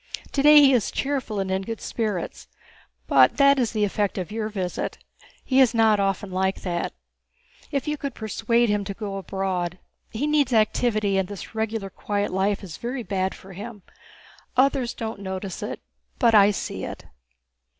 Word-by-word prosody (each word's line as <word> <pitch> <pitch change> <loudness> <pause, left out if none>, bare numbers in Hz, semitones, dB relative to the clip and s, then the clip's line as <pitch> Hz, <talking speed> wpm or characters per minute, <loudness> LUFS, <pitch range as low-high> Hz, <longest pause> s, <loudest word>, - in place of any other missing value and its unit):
Today 295 +1 +7
he 275 -2 +6
is 235 -5 +2
cheerful 270 -7 -2
and 190 -1 -2
in 190 0 0
good 225 +3 -5
spirits, 210 -7 -3 0.6
but 130 - +5
that 280 -1 +5
is 240 -3 +1
the 215 -2 0
effect 205 0 0
of 185 +1 -4
your 220 0 -2
visit—he 205 +6 -4
is 255 -3 +5
not 220 -2 +4
often 195 0 -1
like 190 +1 -1
that. 175 -2 -2 0.8
If 280 0 -2
you 300 0 -1
could 280 -3 -5
persuade 230 +2 +1
him 205 -1 +1
to 200 - -5
go 200 -2 -5
abroad. 190 -2 -2 0.3
He 235 +6 -2
needs 295 -4 +2
activity, 215 -2 +2
and 190 - -1
this 200 -1 -7
quiet - - -18 0.5
regular 205 0 0
life 195 +2 0
is 175 -6 -8
very 245 +1 -4
bad 190 -3 -1
for 190 0 -13
him. 205 +1 -8 0.7
Others 265 -2 +2
don't 220 -2 -5
notice 190 -1 -5
it, - - -4 0.4
but 235 -4 +4
I 205 -1 +7
see 205 - -4
it." - - -7
210 Hz, 170 wpm, -24 LUFS, 195-240 Hz, 0.8 s, Today